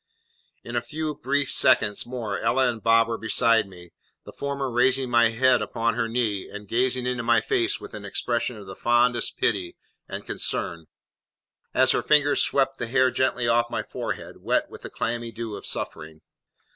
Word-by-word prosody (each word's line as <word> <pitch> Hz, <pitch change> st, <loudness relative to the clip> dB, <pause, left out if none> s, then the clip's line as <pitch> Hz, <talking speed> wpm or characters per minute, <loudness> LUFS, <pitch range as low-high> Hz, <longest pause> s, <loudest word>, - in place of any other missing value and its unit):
In -, -, -7 dB
a -, -, +1 dB
few 155 Hz, 0 st, -4 dB
brief 140 Hz, 0 st, -1 dB
seconds 105 Hz, -5 st, +3 dB
more 115 Hz, -5 st, -4 dB
Ella 125 Hz, +3 st, +2 dB
and 115 Hz, -2 st, -3 dB
Bob 115 Hz, +1 st, +4 dB
were 115 Hz, 0 st, -3 dB
beside 115 Hz, -1 st, +2 dB
me, 90 Hz, -2 st, -14 dB, 0.3 s
the -, -, -11 dB
former 140 Hz, -2 st, -3 dB
raising 130 Hz, +1 st, +2 dB
my 120 Hz, -1 st, +5 dB
head 125 Hz, +2 st, +3 dB
upon 115 Hz, 0 st, -1 dB
her 115 Hz, -1 st, -1 dB
knee, 115 Hz, -4 st, -1 dB
and 105 Hz, 0 st, -9 dB
gazing 125 Hz, +3 st, 0 dB
into 125 Hz, -1 st, -1 dB
my 115 Hz, -, +3 dB
face 390 Hz, -1 st, 0 dB
with -, -, -11 dB
an 105 Hz, -1 st, -7 dB
expression 120 Hz, +3 st, -2 dB
of 105 Hz, -, -10 dB
the 95 Hz, 0 st, -9 dB
fondest 120 Hz, +2 st, +1 dB
pity 95 Hz, -5 st, 0 dB, 0.3 s
and -, -, -6 dB
concern, 85 Hz, -2 st, -2 dB, 0.9 s
as -, -, +5 dB
her -, -, +1 dB
fingers 145 Hz, -1 st, +3 dB
swept 135 Hz, -1 st, +1 dB
the 120 Hz, -, -3 dB
hair 130 Hz, +1 st, +3 dB
gently 125 Hz, -2 st, 0 dB
off 120 Hz, 0 st, +2 dB
my 120 Hz, -, -3 dB
forehead, -, -, -6 dB
wet -, -, 0 dB
with -, -, -11 dB
the -, -, -8 dB
clammy 120 Hz, 0 st, -3 dB
dew 115 Hz, -1 st, -6 dB
of -, -, -8 dB
suffering. 80 Hz, 0 st, -4 dB
120 Hz, 185 wpm, -25 LUFS, 115-130 Hz, 0.9 s, my